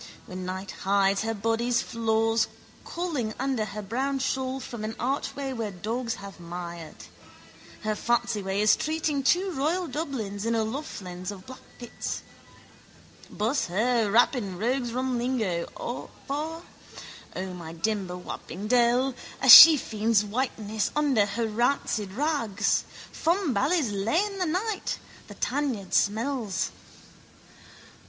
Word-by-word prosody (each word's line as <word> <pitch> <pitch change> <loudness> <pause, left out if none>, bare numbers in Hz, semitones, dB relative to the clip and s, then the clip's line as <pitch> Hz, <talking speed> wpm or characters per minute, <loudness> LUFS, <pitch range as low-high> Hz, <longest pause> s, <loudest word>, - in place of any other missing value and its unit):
When 185 0 -6
night 190 +1 -5
hides 195 0 +2
her 225 0 -2
body's 230 +3 +1
flaws 225 0 +1 0.4
calling 295 -11 -3
under 260 -4 -1
her 210 0 -6
brown 265 +7 -1
shawl 265 0 -1
from 235 -4 -7
an 220 +1 -4
archway 270 +2 -2
where 225 -4 -3
dogs 225 +6 -3
have 200 -3 -10
mired. 170 -1 -7 0.9
Her 215 0 0
fancyman 215 -4 0
is 215 - +5
treating 310 -2 -1
two 365 +8 +2
Royal 330 +5 0
Dublins 240 -11 -4
in 230 +1 0
O'Loughlin's 215 - -4
of 190 -2 -8
Blackpitts. 250 -1 -7 1.1
Buss 230 +7 0
her, 220 +3 +1
wap 240 +5 +5
in 200 -7 -4
rogues' 240 +3 -1
rum 255 0 -1
lingo, 220 -9 -1 0.6
for, 315 +4 -4 0.7
O, 185 0 -4
my 170 -3 -8
dimber 185 +1 -2
wapping 180 +2 -7
dell! 245 +2 +3 0.3
A - - -1
shefiend's 225 -8 +9
whiteness 220 -2 -2
under 275 -9 +3
her 225 +3 -1
rancid 220 -3 0
rags. 230 -7 0 0.3
Fumbally's 320 - +1
lane 335 - 0
that 365 - 0
night: 400 +6 -2 0.3
the - - -11
tanyard 255 -9 -2
smells. 215 -5 0
230 Hz, 120 wpm, -27 LUFS, 200-270 Hz, 1.1 s, shefiend's